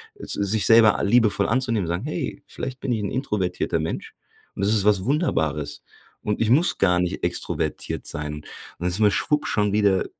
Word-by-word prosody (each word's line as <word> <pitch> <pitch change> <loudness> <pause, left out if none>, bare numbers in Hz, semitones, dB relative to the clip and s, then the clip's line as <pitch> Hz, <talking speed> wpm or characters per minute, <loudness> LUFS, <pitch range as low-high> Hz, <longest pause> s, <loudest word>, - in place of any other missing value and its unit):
s 410 - -6
sich 100 +1 +1
selber 115 -2 +6
liebevoll 105 -2 +3
anzunehmen, 115 -5 0
zu - - -5
sagen: 90 +9 -3
„Hey, 155 -2 -4
vielleicht 130 -1 -6
bin 135 - -3
ich 110 - 0
'n - - -3
introvertierter 105 -9 -2
Mensch - - -5 0.4
und 100 - -1
das 105 - +2
ist 105 -3 +2
was 100 -3 +3
Wunderbares 80 - -1 0.4
und 105 +1 -2
ich 110 - +1
muss 155 +8 +4
gar 90 -2 +3
nicht 90 -1 -2
extrovertiert - - -3
sein.“ 75 0 -4
Und 75 - -12 0.3
da 90 - -2
ist 90 +2 +1
man 105 -2 +4
schwupp 150 +7 0
schon 105 -1 0
wieder 100 -3 +2
105 Hz, 195 wpm, -23 LUFS, 95-120 Hz, 0.4 s, selber